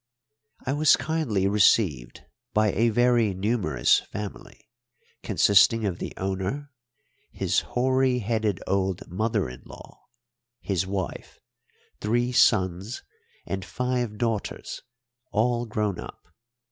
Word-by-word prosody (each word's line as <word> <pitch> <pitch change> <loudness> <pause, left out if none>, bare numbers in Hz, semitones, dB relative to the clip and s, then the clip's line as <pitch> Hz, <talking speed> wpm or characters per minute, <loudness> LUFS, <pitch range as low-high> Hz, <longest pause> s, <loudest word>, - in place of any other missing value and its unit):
I 130 - 0
was 150 +1 +5
kindly 135 -12 0
received 100 - +2 0.3
by 105 -1 +3
a 115 +4 +2
very 120 -3 +2
numerous 95 - +2
family, 105 +1 -9 0.5
consisting 105 +3 +4
of 90 -3 -2
the - - -5
owner, 95 +10 -3 0.6
his - - +1
hoary 130 0 +1
headed 110 -4 -1
old 95 -1 -1
mother 110 - 0
in 60 0 -10
law, - - -14 0.5
his 95 -1 -1
wife, 95 -2 -5 0.6
three 120 +3 0
sons, 95 0 +2 0.4
and 95 -1 -4
five 125 -3 -2
daughters, 115 -3 -3 0.5
all 120 +2 +1
grown 105 -3 -2
up. - - -9
105 Hz, 110 wpm, -26 LUFS, 95-120 Hz, 0.6 s, was